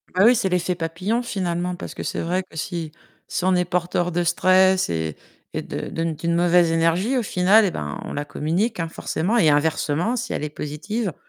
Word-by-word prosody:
Ben 190 Hz, +3 st, +5 dB
oui, 245 Hz, +2 st, +7 dB
c'est 215 Hz, -5 st, 0 dB
l'effet 180 Hz, 0 st, 0 dB
papillon 180 Hz, +8 st, -2 dB
finalement 180 Hz, -5 st, -2 dB
parce -, -, -7 dB
que -, -, -6 dB
c'est -, -, -3 dB
vrai 180 Hz, +3 st, -1 dB
que 180 Hz, -, -15 dB
si 165 Hz, -1 st, -4 dB, 0.4 s
si 180 Hz, -, -2 dB
on 185 Hz, 0 st, +4 dB
est 180 Hz, -, +2 dB
porteur 175 Hz, 0 st, -1 dB
de 175 Hz, +1 st, 0 dB
stress 185 Hz, -, +3 dB
et 80 Hz, -2 st, -2 dB, 0.4 s
et -, -, -2 dB
de -, -, -5 dB
de 165 Hz, -, -3 dB
d'une 165 Hz, +1 st, -1 dB
mauvaise 175 Hz, -1 st, +4 dB
énergie 165 Hz, +10 st, +2 dB
au 245 Hz, -, +1 dB
final 200 Hz, +2 st, +4 dB
et 190 Hz, -, 0 dB
ben 75 Hz, -, -5 dB
on -, -, -6 dB
la 145 Hz, +1 st, -3 dB
communique 170 Hz, +10 st, -1 dB
hein 165 Hz, -, -3 dB
forcément 175 Hz, +7 st, -1 dB
et 165 Hz, -9 st, +5 dB
inversement, 155 Hz, +7 st, +1 dB
si 245 Hz, +2 st, -3 dB
elle -, -, -3 dB
est 150 Hz, -, -2 dB
positive 170 Hz, +8 st, -4 dB
175 Hz, 215 wpm, -22 LUFS, 165-190 Hz, 0.4 s, oui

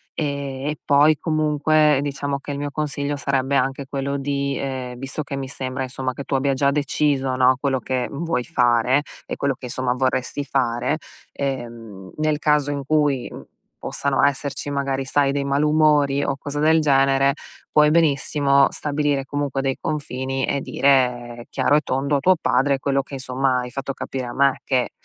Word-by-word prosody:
Ehm, 140 Hz, -2 st, -3 dB
e 150 Hz, 0 st, -2 dB
poi 145 Hz, +2 st, +4 dB
comunque, 155 Hz, -2 st, +2 dB
diciamo 140 Hz, 0 st, -3 dB
che 140 Hz, -, -7 dB
il 140 Hz, -, -4 dB
mio 145 Hz, 0 st, -4 dB
consiglio 145 Hz, -1 st, -2 dB
sarebbe 140 Hz, -1 st, 0 dB
anche 135 Hz, +1 st, 0 dB
quello 140 Hz, 0 st, -2 dB
di 140 Hz, 0 st, -2 dB
ehm, 130 Hz, -2 st, -4 dB
visto 135 Hz, +3 st, -4 dB
che 140 Hz, 0 st, -5 dB
mi 135 Hz, -1 st, -4 dB
sembra, 130 Hz, 0 st, -4 dB
insomma, 130 Hz, 0 st, -3 dB
che 140 Hz, -, -7 dB
tu -, -, -5 dB
abbia 135 Hz, +1 st, +1 dB
già 140 Hz, +1 st, +2 dB
deciso, 140 Hz, -2 st, 0 dB
no, 130 Hz, 0 st, +5 dB
quello 135 Hz, -2 st, 0 dB
che 125 Hz, 0 st, -2 dB
vuoi 160 Hz, -2 st, -2 dB
fare 125 Hz, -1 st, +2 dB, 0.2 s
e -, -, -4 dB
quello 140 Hz, -1 st, 0 dB
che -, -, -9 dB
insomma 125 Hz, 0 st, -1 dB
vorresti 130 Hz, +2 st, -1 dB
fare, 130 Hz, +1 st, 0 dB, 0.3 s
ehm, 115 Hz, -8 st, -6 dB
nel 155 Hz, -1 st, +1 dB
caso 150 Hz, -1 st, +2 dB
in 140 Hz, -1 st, -3 dB
cui, 145 Hz, -4 st, +1 dB, 0.5 s
possano 140 Hz, -1 st, 0 dB
esserci, 140 Hz, +1 st, -1 dB
magari 140 Hz, -1 st, -2 dB
sai, 140 Hz, +1 st, +2 dB
dei 140 Hz, 0 st, -1 dB
malumori 145 Hz, 0 st, +3 dB
o 135 Hz, -, -1 dB
cose 145 Hz, +2 st, -5 dB
del 160 Hz, +1 st, +4 dB
genere, 135 Hz, -1 st, +3 dB, 0.4 s
puoi 150 Hz, 0 st, +5 dB
benissimo 140 Hz, -3 st, +3 dB
stabilire 145 Hz, -2 st, -1 dB
comunque 140 Hz, -1 st, -2 dB
dei 135 Hz, -1 st, -1 dB
confini, 135 Hz, -3 st, -2 dB
e 140 Hz, -, -1 dB
dire 120 Hz, -3 st, +1 dB
chiaro 140 Hz, +2 st, +2 dB
e -, -, +1 dB
tondo 140 Hz, +1 st, 0 dB
a -, -, -1 dB
tuo 185 Hz, +6 st, +4 dB
padre 130 Hz, +2 st, +2 dB
quello 135 Hz, 0 st, 0 dB
che, 140 Hz, +1 st, -9 dB
insomma, 130 Hz, 0 st, 0 dB
hai 125 Hz, 0 st, -7 dB
fatto 135 Hz, 0 st, -4 dB
capire 130 Hz, -2 st, -5 dB
a 120 Hz, -, -6 dB
me: 140 Hz, 0 st, +2 dB
che 125 Hz, -2 st, 0 dB
140 Hz, 175 wpm, -22 LUFS, 130-145 Hz, 0.5 s, no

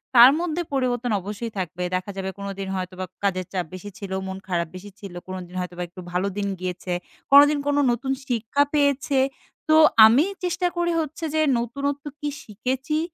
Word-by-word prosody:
তার 240 Hz, +3 st, +10 dB
মধ্যে 345 Hz, 0 st, -1 dB
পরিবর্তন 245 Hz, -3 st, 0 dB
অবশ্যই 210 Hz, +4 st, -5 dB
থাকবে। 180 Hz, -1 st, -3 dB
দেখা 185 Hz, +2 st, -3 dB
যাবে, 190 Hz, 0 st, -2 dB
কোনোদিন 195 Hz, -1 st, -5 dB
হয়তো 185 Hz, 0 st, -4 dB
বা 185 Hz, -, -2 dB, 0.2 s
কাজের 185 Hz, -2 st, 0 dB
চাপ 180 Hz, -3 st, -1 dB
বেশি 185 Hz, +3 st, -7 dB
ছিল, 200 Hz, -3 st, -7 dB, 0.2 s
মন 190 Hz, 0 st, -5 dB
খারাপ 170 Hz, -2 st, 0 dB
বেশি 195 Hz, +3 st, -9 dB
ছিল, 195 Hz, -3 st, -9 dB
কোনোদিন 185 Hz, -1 st, -7 dB
হয়তোবা 180 Hz, 0 st, -4 dB
একটু 180 Hz, -, -13 dB
ভালো 180 Hz, +2 st, 0 dB
দিন 200 Hz, -1 st, -1 dB
গিয়েছে, 180 Hz, 0 st, -4 dB, 0.4 s
কোনোদিন 290 Hz, +1 st, +8 dB
কোনো 290 Hz, 0 st, +2 dB
নতুন 265 Hz, +3 st, -2 dB, 0.2 s
শিক্ষা 245 Hz, +3 st, +1 dB
পেয়েছে। 280 Hz, -2 st, +2 dB, 0.5 s
তো, 310 Hz, -, +6 dB, 0.3 s
আমি 235 Hz, +7 st, +6 dB, 0.2 s
চেষ্টা 360 Hz, 0 st, 0 dB
করি 345 Hz, 0 st, +1 dB
হচ্ছে 315 Hz, +1 st, -4 dB
যে, 315 Hz, -, +3 dB, 0.2 s
নতুনত্ব 280 Hz, +4 st, -3 dB
কী 295 Hz, -, -2 dB
শিখেছি? 260 Hz, +8 st, -2 dB
220 Hz, 175 wpm, -24 LUFS, 185-280 Hz, 0.5 s, তার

